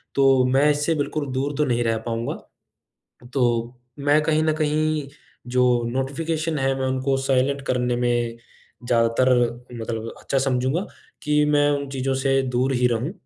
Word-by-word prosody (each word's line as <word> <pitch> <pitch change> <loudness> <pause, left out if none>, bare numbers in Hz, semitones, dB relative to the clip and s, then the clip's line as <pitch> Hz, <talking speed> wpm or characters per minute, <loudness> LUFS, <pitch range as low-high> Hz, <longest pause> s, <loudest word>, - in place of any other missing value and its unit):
तो 135 -2 +4
मैं 135 +4 +3
इससे 150 +2 0
बिल्कुल 145 0 -2
दूर 140 +3 -1
तो 150 - +2
नहीं 120 -2 0
रह 115 -1 0
पाऊँगा। 115 0 -2 1.0
तो 135 - 0 0.6
मैं 145 +2 +3
कहीं 155 0 +1
न 155 0 +2
कहीं 155 -1 0 0.4
जो 125 0 +2 0.3
नोटिफ़िकेशन 155 +4 -2
है, 135 0 +1
मैं 130 - -1
उनको 130 +1 0
साइलेंट 135 +1 +1
करने 125 -1 0
में 120 -1 0 0.5
ज्यादातर 115 +2 +3 0.5
मतलब 115 0 -4
अच्छा 135 - -1
समझूँगा 130 +6 0 0.4
कि 150 0 +2
मैं 145 0 +3
उन 140 -1 -2
चीज़ों 135 0 -1
से 135 0 +1
दूर 130 +1 0
ही 125 0 +2
रहूँ 120 +8 -2
135 Hz, 155 wpm, -23 LUFS, 125-145 Hz, 1.0 s, तो